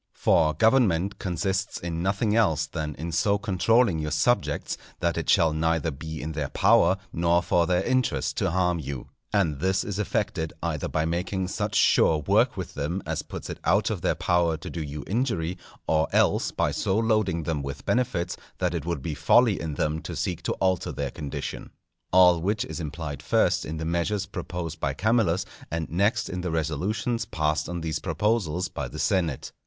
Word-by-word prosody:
For 75 -1 +3
government 100 - +3
consists 95 +2 -2
in 85 -1 -4
nothing 100 +3 +1
else 80 -9 +3
than 75 -1 -4
in 85 +2 -5
so 100 +5 +2
controlling 100 0 +2
your 75 0 -2
subjects 80 +11 +1 0.2
that 85 -1 0
it - - -3
shall 80 -2 +4
neither 80 +1 0
be 80 +3 -7
in 80 - -3
their 75 -3 -3
power 95 -2 +4 0.2
nor 85 +1 +2
for 85 -1 +2
their 90 0 +2
interest 125 - 0
to - - +1
harm 90 -1 +1
you. 70 -3 -6 0.2
And 85 -9 +1
this 95 +4 +1
is 100 -1 -4
effected 95 -6 -1
either 80 -4 -2
by 80 0 0
making 90 +3 -2
such - - -2
sure 80 - +4
work 75 - +2
with - - -5
them 80 +6 -3
as - - -2
puts - - -8
it - - -6
out - - +2
of - - -3
their - - +1
power 85 -2 +1
to 80 - -8
do 85 - -4
you 75 -1 -5
injury, 95 -7 -1 0.3
or 80 -1 +2
else - - +3
by - - 0
so 95 - 0
loading 110 -7 +1
them 75 -2 -2
with 70 +1 -6
benefits 105 -9 0 0.2
that 90 -2 0
it 85 -2 -3
would 85 -6 -2
be 80 - -2
folly 105 - +4
in 80 -3 -4
them 75 +2 -1
to - - -6
seek - - -2
to - - -1
alter 95 -3 0
their - - -3
condition. 70 - -6 0.4
All 90 -2 +6
which 105 +5 0
is 80 +2 -6
implied 75 -3 -5
first - - +2
in 80 +1 -5
the 80 - -4
measures 85 +5 0
proposed 85 -4 -5
by 70 -2 -1
Camillus, 100 -2 +2 0.2
and 85 -1 -2
next 105 +6 +1
in 90 0 -4
the 90 - -2
resolutions 95 - -1
passed 75 -2 -1
on 90 -1 -4
these 80 -1 -2
proposals 95 -5 0
by 70 -7 -5
the - - -9
senate. 85 -8 0
85 Hz, 190 wpm, -26 LUFS, 80-95 Hz, 0.4 s, All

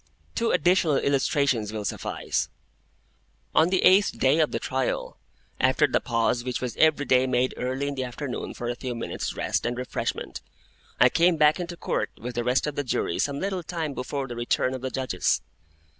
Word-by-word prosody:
Two 230 -1 0
additional 175 -4 +3
illustrations 135 -5 +1
will 105 -1 -4
suffice. - - -2 1.0
On 160 +2 +5
the 185 0 +1
eighth 195 +2 +5
day 135 +4 +3
of 155 - +3
the - - -1
trial, 130 -1 -2 0.4
after 130 +4 +4
the 130 - +1
pause 120 0 0
which 125 -1 -2
was 125 -2 -4
every 155 -2 +4
day 130 0 +3
made 130 0 +1
early 130 +3 -2
in 145 - -2
the 130 -1 -3
afternoon 125 +2 -5
for 120 - -5
a 120 - 0
few 125 0 -5
minutes' 115 - -4
rest - - -1
and 120 +1 -2
refreshment, 125 - -4 0.6
I - - +7
came 170 0 +3
back 150 +2 +4
into 175 -1 -5
Court - - -1
with 125 +2 -6
the 120 0 -1
rest 125 +2 +2
of 150 - -2
the 145 - -2
Jury 120 -8 -1
some 140 0 0
little 190 -1 -2
time 165 -3 -4
before 135 +1 -4
the 120 - -6
return 120 +2 0
of 130 - -5
the 130 - -2
Judges. 130 -8 0
130 Hz, 190 wpm, -26 LUFS, 125-155 Hz, 1.0 s, I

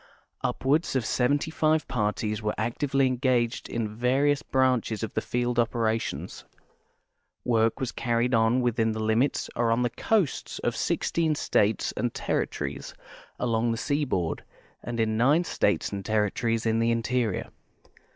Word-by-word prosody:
Upwards 145 +4 +1
of 125 -4 +1
seventy 145 +7 +1
five 155 0 +1
parties 105 -1 -1
were 105 0 -1
actively 135 +5 0
engaged 125 -2 0
in 115 - -2
the 105 - -3
various 135 +6 +2
branches 130 -6 +1
of 110 - -4
the 110 - 0
field 120 +1 -1
operations. 115 -1 -1 1.0
Work 115 0 +2
was 130 -3 -2
carried 120 +1 0
on 115 +2 +3
within 115 -2 +1
the 110 - -4
limits 115 +6 +1
or 120 -1 +1
on 115 +2 +2
the 120 - 0
coasts 200 - 0
of - - -2
sixteen 160 -2 0
states 105 -6 +1
and - - -2
territories - - -3 0.4
along 115 -1 +1
the 115 - -1
seaboard 130 - -1 0.4
and 120 -1 -5
in 110 -1 +1
nine 145 +9 +4
states 105 -10 0
and 100 -1 -4
territories 110 +2 0
in 115 0 +2
the 115 0 +2
interior. 115 -2 -1
120 Hz, 145 wpm, -27 LUFS, 110-130 Hz, 1.0 s, nine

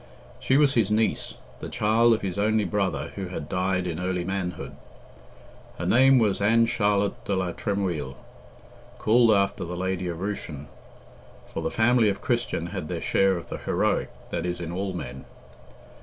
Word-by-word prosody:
She 130 - +2
was 145 -2 +4
his 115 -6 +2
niece, 110 +1 0 0.2
the - - -6
child 115 +2 +3
of - - -6
his 95 0 -3
only 110 +1 +2
brother, 100 -2 -1
who 95 -2 -5
had 85 -5 -6
died 90 0 0
in 85 -2 -3
early 90 -1 -1
manhood. 95 -2 -4 1.0
Her - - -4
name 135 +2 +5
was 105 -5 +2
Ann 115 +3 +4
Charlotte 105 -3 0
de 100 - -1
la 95 -2 -1
Tremouille, 90 - -2 0.8
called 115 +1 +4
after 100 -2 +2
the 90 +1 -5
lady 95 0 -2
of 85 -2 -4
Rushen, 90 -7 -4 0.9
for - - -3
the - - -1
family 115 +1 +3
of 100 - -2
Christian - - -1
had - - -4
their - - -3
share 95 -1 +2
of 85 - -9
the - - -5
heroic - - 0 0.2
that 85 - -2
is 90 0 -3
in 85 -1 -5
all 95 +2 -3
men. 65 -6 -7
100 Hz, 170 wpm, -26 LUFS, 90-110 Hz, 1.0 s, name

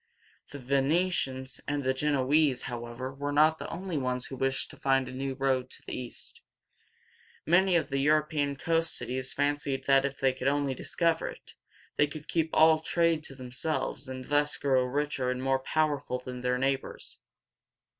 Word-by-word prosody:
The 145 - -8
Ve 140 +1 0
ne´tians 135 -4 0
and 145 0 -1
Gen 150 +2 +1
o 130 -2 +1
ese´, 145 -4 +4
however, 120 +2 -5
were 145 +1 -3
not 155 +2 +4
the - - -6
only 180 -4 -3
ones 125 -1 -2
who 135 - -7
wished 135 0 -1
to - - -14
find 135 -1 +2
a - - -6
new 135 +1 -3
road 130 -2 0
to - - -10
the - - -5
East. 125 -2 -6 1.0
Many 180 +2 +4
of 155 -4 +1
the 140 0 0
European 150 0 +2
coast 165 +3 0
cities 130 +1 -4
fancied 145 -1 -1
that 135 -1 +5
if 140 0 -3
they 135 -1 +3
could 130 - -3
only 140 -1 +1
discover 165 +5 0
it, - - -10 0.4
they 150 - +4
could 155 +1 -9
keep 165 -1 0
the 160 0 +5
trade 165 -1 +2
all - - -18
to 135 - -11
themselves, 130 +2 -3
and 130 -1 -6
thus 145 0 +1
grow 130 -2 +2
richer 140 -1 -1
and 125 0 -2
more 135 0 +2
powerful 145 -2 0
than 125 0 -7
their 125 0 +1
neighbors. 135 +1 -2
140 Hz, 185 wpm, -29 LUFS, 130-150 Hz, 1.0 s, that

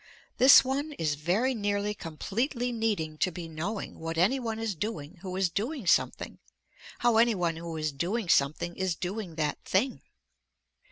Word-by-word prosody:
This 265 +2 +9
one 285 +4 -2
is 160 - -1
very 180 - +1
nearly 205 -2 -1
completely 235 - -2
needing 205 -10 -2
to 185 - +2
be 170 0 -7
knowing 170 +7 -5
what 165 0 -4
any 205 +11 +3
one 225 -3 -3
is 225 -2 -2
doing 170 -3 -5
who 185 -1 -5
is 190 -2 +1
doing 235 - -3
something, 175 - +1 0.6
how 240 -2 +3
any 230 0 +4
one 170 -3 -1
who 165 -1 -6
is 155 -1 -1
doing 180 +9 -2
something 155 +3 +2
is 190 -2 0
doing 185 -1 -5
that 150 -2 -1
thing. 245 +8 0
190 Hz, 165 wpm, -29 LUFS, 165-225 Hz, 0.6 s, This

